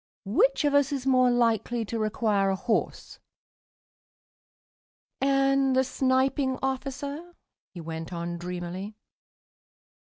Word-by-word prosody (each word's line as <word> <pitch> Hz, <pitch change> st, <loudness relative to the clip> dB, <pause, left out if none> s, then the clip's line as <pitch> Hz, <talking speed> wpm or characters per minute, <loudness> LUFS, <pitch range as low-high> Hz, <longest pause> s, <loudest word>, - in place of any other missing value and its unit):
Which 365 Hz, -, +2 dB
of 290 Hz, -, +2 dB
us 285 Hz, -1 st, +3 dB
is 270 Hz, -2 st, -3 dB
more 255 Hz, -1 st, +4 dB
likely 235 Hz, -1 st, +1 dB
to 230 Hz, +2 st, -4 dB
require 215 Hz, -2 st, +1 dB
a 190 Hz, -, +1 dB
horse?" 220 Hz, +4 st, -2 dB, 2.0 s
"And 275 Hz, -1 st, +2 dB
the 260 Hz, -, +4 dB
Sniping 260 Hz, +1 st, +1 dB
officer?" 280 Hz, +5 st, -4 dB, 0.4 s
he 175 Hz, -, -6 dB
went 160 Hz, +1 st, -6 dB
on 170 Hz, 0 st, -4 dB
dreamily. 180 Hz, +3 st, -6 dB
255 Hz, 110 wpm, -27 LUFS, 195-275 Hz, 2.0 s, more